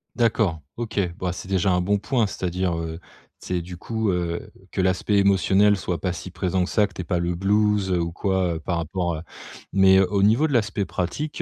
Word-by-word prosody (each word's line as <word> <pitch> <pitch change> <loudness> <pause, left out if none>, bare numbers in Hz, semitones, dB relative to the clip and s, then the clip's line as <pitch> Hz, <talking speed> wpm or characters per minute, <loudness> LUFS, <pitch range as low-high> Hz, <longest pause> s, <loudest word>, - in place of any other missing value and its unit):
D'accord, 105 -9 +1 0.2
OK, 115 -2 -5 0.2
bah, 90 -1 -1
c'est 90 - -8
déjà 95 0 +2
un 90 0 +2
bon 100 +3 +1
point. 115 +3 +1
C'est-à-dire, 90 -2 -2
heu, 80 0 -5 0.4
c'est 90 -1 -2
du 90 +1 -8
coup, 110 +3 -2
heu, 85 -1 -2 0.2
que - - -4
l'aspect 95 +2 +1
émotionnel 100 +1 +4
soit 90 -4 -3
pas 90 +1 -1
si 90 0 -8
présent 90 +1 0
que 90 - -3
ça, 105 -2 +3
que 95 - -20
tu - - -5
aies - - -5
pas 85 +1 -1
le 85 0 -1
blues, 105 0 +2
heu, 90 - +2
ou 85 0 -2
quoi 95 -2 0
par 85 - -1
rapport, 85 +1 -2
heu 80 - -6 0.5
mais 95 0 +6
au 100 +1 +2
niveau 115 +10 +4
de 145 - -3
l'aspect 105 -4 +1
pratique, 145 - -3
95 Hz, 215 wpm, -24 LUFS, 90-105 Hz, 0.5 s, mais